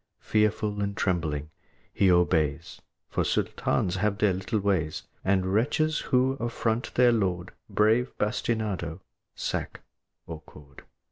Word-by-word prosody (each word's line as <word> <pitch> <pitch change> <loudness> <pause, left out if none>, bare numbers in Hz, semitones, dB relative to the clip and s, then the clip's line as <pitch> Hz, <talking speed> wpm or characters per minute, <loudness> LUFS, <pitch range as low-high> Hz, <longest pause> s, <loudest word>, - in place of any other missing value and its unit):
Fearful 105 -1 +1
and 100 0 -2
trembling, 80 -5 -1 0.4
he 95 -2 +4
obeys, 80 -3 +1 0.3
For - - -1
Sultans 90 +1 0
have 105 +1 0
their 105 -3 +3
little 95 +4 -2
ways, 95 -6 0 0.2
And 95 -1 +1
wretches 150 +8 +2
who 130 +1 +2
affront 115 0 -2
their 125 -1 +6
lord 95 -6 0 0.2
Brave 110 +4 +3
bastinado, 105 -6 -2 0.3
sack, - - -3 0.4
or 80 -2 -7
cord. 70 -2 -16
100 Hz, 120 wpm, -27 LUFS, 90-110 Hz, 0.4 s, their